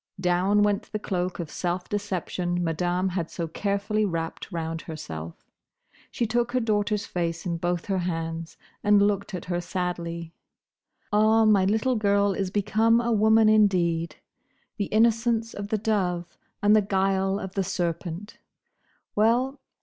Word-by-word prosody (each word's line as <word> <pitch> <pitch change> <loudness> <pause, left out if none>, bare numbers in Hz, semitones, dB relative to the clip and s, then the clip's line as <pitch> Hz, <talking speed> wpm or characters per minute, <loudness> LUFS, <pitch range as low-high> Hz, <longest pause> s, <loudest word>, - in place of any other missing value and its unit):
Down 185 +3 +2
went 205 0 0
the 215 - -1
cloak 185 -3 -2
of 165 -3 -5
self 180 0 -2
deception 180 -3 -2
Madame 175 +3 0
had 175 -3 -3
so 170 -2 -4
carefully 200 +5 -1
wrapped 165 -1 -3
round 165 -1 -3
herself. 80 - -7 0.7
She 235 - -1
took 240 +2 0
her 255 - +3
daughter's 210 -2 0
face 170 -2 -3
in 170 -2 -1
both 175 0 -2
her 195 -2 0
hands 165 -2 -4 0.3
and 205 -1 +5
looked 200 -1 +1
at 180 - -6
her 175 -1 -2
sadly. 170 -2 -4 0.8
"Ah! 220 +1 +5
my 205 -3 +5
little 220 +5 +1
girl 200 -1 +2
is 195 -1 -2
become 220 +4 +2
a 235 0 0
woman 220 0 +5
indeed! 180 -6 +3 0.6
The 205 - 0
innocence 225 +1 +2
of 200 0 -5
the 215 - 0
dove, 180 -5 -1 0.3
and 205 +1 +6
the 215 - +5
guile 195 0 +1
of 190 - -6
the 195 - 0
serpent!—Well! 205 - -3
195 Hz, 145 wpm, -26 LUFS, 175-215 Hz, 0.8 s, and